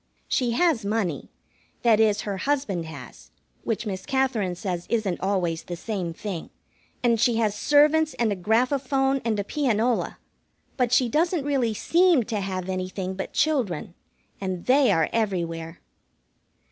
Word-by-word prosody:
She 245 Hz, -3 st, +1 dB
has 315 Hz, -3 st, +2 dB
money 200 Hz, -7 st, -2 dB, 0.5 s
that 225 Hz, -3 st, +5 dB
is, 210 Hz, -2 st, +3 dB
her 200 Hz, -2 st, -4 dB
husband 205 Hz, -, -1 dB
has, 160 Hz, -, -11 dB, 0.3 s
which 225 Hz, 0 st, -2 dB
Miss 190 Hz, -3 st, -4 dB
Katherine 260 Hz, -9 st, 0 dB
says 175 Hz, -1 st, -4 dB
isn't 215 Hz, -6 st, 0 dB
always 180 Hz, -4 st, 0 dB
the 175 Hz, -, -6 dB
same 180 Hz, -1 st, -4 dB
thing. 180 Hz, 0 st, -6 dB, 0.5 s
And 235 Hz, -2 st, +3 dB
she 240 Hz, +1 st, +3 dB
has 220 Hz, -3 st, +1 dB
servants 300 Hz, +7 st, +3 dB
and 230 Hz, -3 st, +1 dB
a -, -, 0 dB
graphophone 265 Hz, +6 st, +1 dB
and 220 Hz, -3 st, 0 dB
a -, -, 0 dB
pianola, 240 Hz, -1 st, 0 dB, 0.6 s
but 250 Hz, -3 st, +1 dB
she 250 Hz, 0 st, +4 dB
doesn't 315 Hz, +4 st, +1 dB
really 255 Hz, -6 st, 0 dB
seem 340 Hz, -, +3 dB
to 220 Hz, -1 st, -3 dB
have 190 Hz, -2 st, -3 dB
anything 185 Hz, 0 st, -3 dB
but 190 Hz, 0 st, -5 dB
children, 245 Hz, -, 0 dB, 0.5 s
and 185 Hz, -2 st, -4 dB
they 265 Hz, +1 st, +4 dB
are 160 Hz, -1 st, +2 dB
everywhere. 170 Hz, -6 st, -2 dB
220 Hz, 145 wpm, -25 LUFS, 185-265 Hz, 0.6 s, that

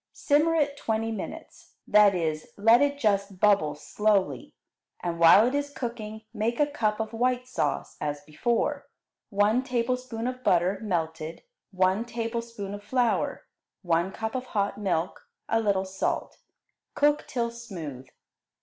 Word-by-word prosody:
Simmer 310 Hz, +3 st, +2 dB
it 285 Hz, -3 st, +1 dB
twenty 225 Hz, -3 st, -1 dB
minutes, 215 Hz, -, -8 dB
that 210 Hz, -2 st, +6 dB
is, 155 Hz, -3 st, -2 dB
let 225 Hz, +5 st, +6 dB
it 285 Hz, 0 st, +2 dB
just 200 Hz, -6 st, 0 dB
bubble 195 Hz, -8 st, +3 dB
slowly, 205 Hz, +5 st, 0 dB, 0.5 s
and 170 Hz, -1 st, -2 dB
while 170 Hz, +6 st, +8 dB
it 250 Hz, -, -1 dB
is 285 Hz, 0 st, -1 dB
cooking 225 Hz, -5 st, -6 dB
make 230 Hz, +3 st, -1 dB
a 295 Hz, -, +5 dB
cup 220 Hz, -7 st, -1 dB
of 220 Hz, +1 st, -3 dB
white 250 Hz, +2 st, 0 dB
sauce 255 Hz, -, -2 dB
as 145 Hz, -1 st, -2 dB
before: 190 Hz, +11 st, -1 dB, 0.4 s
one 210 Hz, +4 st, +3 dB
tablespoonful 250 Hz, -2 st, -2 dB
of 255 Hz, -, -26 dB
butter, 180 Hz, +3 st, +2 dB
melted, 160 Hz, -5 st, -3 dB, 0.3 s
one 190 Hz, +2 st, +1 dB
tablespoonful 230 Hz, -3 st, -4 dB
of 205 Hz, 0 st, -8 dB
flour, 245 Hz, +2 st, 0 dB, 0.4 s
one 170 Hz, +1 st, +1 dB
cup 220 Hz, +2 st, -4 dB
of 255 Hz, -1 st, -4 dB
hot 200 Hz, +1 st, 0 dB
milk, 180 Hz, -4 st, -2 dB, 0.2 s
a 225 Hz, -, +2 dB
little 200 Hz, -3 st, +1 dB
salt. 190 Hz, 0 st, -3 dB, 0.6 s
Cook 295 Hz, 0 st, +2 dB
till 235 Hz, -2 st, -1 dB
smooth. 165 Hz, -, -8 dB
215 Hz, 140 wpm, -27 LUFS, 190-240 Hz, 0.6 s, while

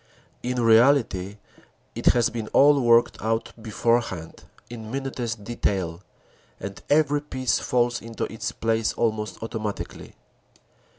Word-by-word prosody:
In 125 Hz, 0 st, -2 dB
reality 115 Hz, -4 st, +3 dB, 0.6 s
it -, -, -4 dB
has 120 Hz, -2 st, +4 dB
been 115 Hz, -2 st, -4 dB
all 145 Hz, 0 st, +6 dB
worked 120 Hz, -1 st, +3 dB
out 115 Hz, +1 st, -1 dB
beforehand 110 Hz, -6 st, -1 dB, 0.2 s
in 115 Hz, -2 st, -8 dB
minutest 120 Hz, -4 st, -4 dB
detail 95 Hz, -6 st, -2 dB, 0.6 s
and 100 Hz, 0 st, -7 dB
every 145 Hz, -1 st, +3 dB
piece 130 Hz, -4 st, -1 dB
falls 120 Hz, -1 st, 0 dB
into 115 Hz, -1 st, -6 dB
its 110 Hz, -, -3 dB
place 115 Hz, 0 st, 0 dB
almost 110 Hz, -2 st, -2 dB
automatically. 110 Hz, -2 st, -5 dB
115 Hz, 115 wpm, -24 LUFS, 110-125 Hz, 0.6 s, all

